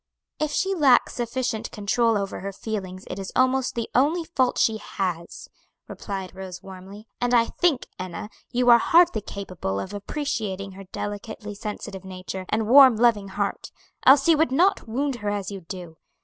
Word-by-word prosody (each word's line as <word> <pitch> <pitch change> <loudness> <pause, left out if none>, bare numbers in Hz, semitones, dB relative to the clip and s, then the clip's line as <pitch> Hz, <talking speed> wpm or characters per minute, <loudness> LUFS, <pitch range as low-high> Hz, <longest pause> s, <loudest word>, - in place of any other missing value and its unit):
"If 305 - 0
she 385 +6 0
lacks 280 -9 +4
sufficient 240 -2 -2
control 220 +2 +1
over 195 -1 -3
her 200 +1 -5
feelings 190 -2 -5
it 180 - -6
is 195 - -6
almost 260 0 +2
the 230 -1 -2
only 305 +7 +2
fault 260 -6 0
she 220 -1 +2
has," 180 -5 -4 0.4
replied 195 -3 -6
Rose 190 -1 -8
warmly. 195 +3 -11
"And 245 0 +2
I 230 -1 +5
think, 315 -1 0
Enna, 185 +2 -6 0.2
you 245 0 +3
are 235 - +8
hardly 340 -5 +4
capable 185 - -5
of 185 - -6
appreciating 205 -4 -3
her 195 +1 -11
delicately 205 +2 -6
sensitive 205 -2 -6
nature, 185 0 -7
and 215 0 0
warm, 260 0 +8
loving 220 -3 +3
heart, 200 +1 -3 0.3
else 275 +2 +6
you 325 -3 +5
would 320 -4 +3
not 350 +1 +2
wound 265 +3 -1
her 205 -2 -3
as 205 -1 -3
you 195 -1 -7
do. 170 -1 -9
210 Hz, 170 wpm, -24 LUFS, 190-255 Hz, 0.4 s, are